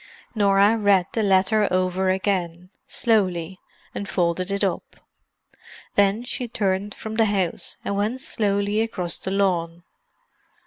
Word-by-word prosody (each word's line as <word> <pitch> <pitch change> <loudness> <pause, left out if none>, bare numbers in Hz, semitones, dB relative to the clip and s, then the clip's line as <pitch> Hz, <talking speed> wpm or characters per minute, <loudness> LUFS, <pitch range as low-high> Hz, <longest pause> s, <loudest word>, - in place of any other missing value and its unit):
Norah 205 0 +4
read 200 -3 +4
the 225 - 0
letter 200 +1 +3
over 185 +1 0
again, 185 -2 -2 0.2
slowly, 185 -5 0 0.3
and 200 - -5
folded 180 +1 0
it 200 +1 0
up. 190 -4 -2 1.0
Then 205 +3 +2
she 250 0 -4
turned 200 -2 -2
from 220 0 -7
the 225 - +4
house, 195 -5 -1
and 200 - -1
went 215 +6 -1
slowly 205 -3 0
across 185 -6 -2
the - - -4
lawn. 175 -4 0
195 Hz, 130 wpm, -23 LUFS, 185-210 Hz, 1.0 s, Norah